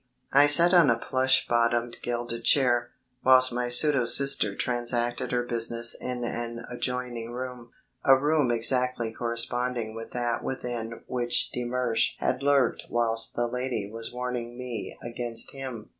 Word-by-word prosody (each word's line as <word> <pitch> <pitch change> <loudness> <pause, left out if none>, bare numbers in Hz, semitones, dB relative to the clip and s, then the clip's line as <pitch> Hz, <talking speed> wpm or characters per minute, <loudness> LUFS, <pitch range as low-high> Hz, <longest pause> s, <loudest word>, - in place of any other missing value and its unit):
I 140 +2 +6
sat 170 +5 +6
on 170 -6 +5
a 115 - +2
plush 130 0 +1
bottomed 120 0 0
gilded 120 -1 -4
chair, 120 -3 +2 0.3
whilst 130 -1 +5
my 125 0 -2
pseudo 130 +1 +6
sister 135 -7 +5
transacted 120 -1 -1
her 120 -1 0
business 115 0 -1
in 125 -1 -6
an 120 0 -5
adjoining 120 -2 -4
room 125 -1 -7 0.3
a 135 0 +6
room 145 -1 +1
exactly 120 0 +1
corresponding 120 0 -3
with 115 0 -9
that 120 -1 -2
within 120 -3 -6
which 120 -1 0
de 125 - -5
Mersch 120 -2 0
had - - -2
lurked 140 -1 +1
whilst 115 -1 +1
the 120 - 0
lady 120 -4 -4
was 115 0 -6
warning 125 -1 -5
me 125 -4 -7
against 120 -1 -1
him. 130 -5 -8
120 Hz, 145 wpm, -26 LUFS, 115-125 Hz, 0.3 s, I